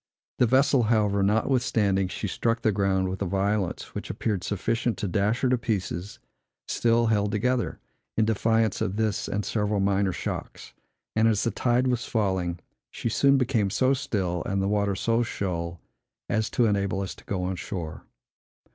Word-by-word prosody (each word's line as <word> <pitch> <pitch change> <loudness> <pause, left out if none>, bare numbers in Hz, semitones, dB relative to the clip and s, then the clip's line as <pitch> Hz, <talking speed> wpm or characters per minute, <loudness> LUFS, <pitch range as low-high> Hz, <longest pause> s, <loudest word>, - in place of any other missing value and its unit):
The 125 - +5
vessel, 135 +2 +4
however, 105 -3 +2
notwithstanding 105 -2 +2
she 105 - -4
struck 115 +5 -1
the 110 - +4
ground 95 -1 +1
with 95 +1 -4
a 100 - 0
violence 100 +1 -1
which - - -6
appeared 100 -5 -2
sufficient 115 +3 -1
to 100 - -2
dash 105 +5 +1
her 130 - +3
in 125 - +3
pieces, 100 -1 -3 0.5
still 115 0 +2
held 105 -2 +1
together, 120 +3 0 0.4
in 110 - +4
defiance 110 -1 +1
of 95 - -1
this 110 -2 0
and 105 0 -2
several 105 -2 0
minor 100 0 +2
shocks; 90 - -6 0.4
and, 110 +1 +4
as 110 -2 +2
the 115 - +1
tide 125 +1 +1
was 125 -2 0
falling, 95 -6 0 0.3
she 115 - -3
soon 140 +4 +4
became 120 -6 +1
so 130 +7 +2
still, 95 -9 -1
and 100 0 0
the 95 - +1
water 100 -1 +1
so 115 +4 +1
shoal, 85 -6 -3 0.5
as 110 0 0
to 120 - +2
enable 100 -3 0
us 95 - -4
to - - -17
go 95 -3 -2
on 95 +1 -1
shore. 85 -3 -6
105 Hz, 175 wpm, -26 LUFS, 95-115 Hz, 0.5 s, The